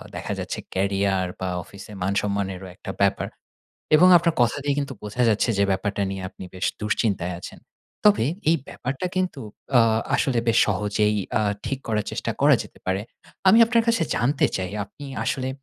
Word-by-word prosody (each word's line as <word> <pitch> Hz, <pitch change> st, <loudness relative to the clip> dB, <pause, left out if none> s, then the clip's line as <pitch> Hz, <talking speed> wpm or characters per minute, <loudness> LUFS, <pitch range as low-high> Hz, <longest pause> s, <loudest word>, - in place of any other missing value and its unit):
দেখা -, -, -4 dB
যাচ্ছে -, -, -4 dB
career 95 Hz, -1 st, +1 dB
বা 95 Hz, -, -2 dB
অফিসে 100 Hz, +4 st, -12 dB
মান 95 Hz, +2 st, 0 dB
সম্মানেরও 95 Hz, -2 st, -3 dB
একটা 95 Hz, -, -7 dB
ব্যাপার। 100 Hz, -, +2 dB, 0.7 s
এবং 180 Hz, +4 st, +7 dB
আপনার 170 Hz, -1 st, +1 dB
কথাতেই 140 Hz, +4 st, +1 dB
কিন্তু 140 Hz, -1 st, -3 dB
বোঝা 110 Hz, +4 st, -1 dB
যাচ্ছে 110 Hz, +2 st, +2 dB
যে 100 Hz, -, +4 dB
ব্যাপারটা 100 Hz, +1 st, -1 dB
নিয়ে 95 Hz, -1 st, -5 dB
আপনি -, -, -11 dB
বেশ 95 Hz, -, -3 dB, 0.2 s
দুশ্চিন্তায় 100 Hz, -4 st, 0 dB
আছেন। -, -, -9 dB, 0.5 s
তবে 205 Hz, -, +5 dB, 0.2 s
এই 165 Hz, -, +4 dB
ব্যাপারটা 135 Hz, +7 st, -4 dB
কিন্তু 185 Hz, -7 st, -1 dB, 0.4 s
আ -, -, +8 dB, 0.4 s
আসলে 135 Hz, -3 st, +1 dB
বেশ 115 Hz, 0 st, +3 dB
সহজেই 105 Hz, 0 st, +1 dB, 0.2 s
আ -, -, +1 dB, 0.2 s
ঠিক 135 Hz, -, -2 dB
করার 105 Hz, -2 st, 0 dB
চেষ্টা -, -, -2 dB
করা -, -, +6 dB
যেতে -, -, -16 dB
পারে। 95 Hz, +2 st, 0 dB, 0.5 s
আমি 220 Hz, +5 st, +7 dB
আপনার 230 Hz, 0 st, +2 dB
কাছে 230 Hz, -7 st, +3 dB
জানতে 130 Hz, +5 st, +2 dB
চাই 95 Hz, 0 st, -3 dB
আপনি 140 Hz, +8 st, -12 dB, 0.2 s
আসলে 130 Hz, +2 st, -1 dB
105 Hz, 170 wpm, -24 LUFS, 95-140 Hz, 0.7 s, আ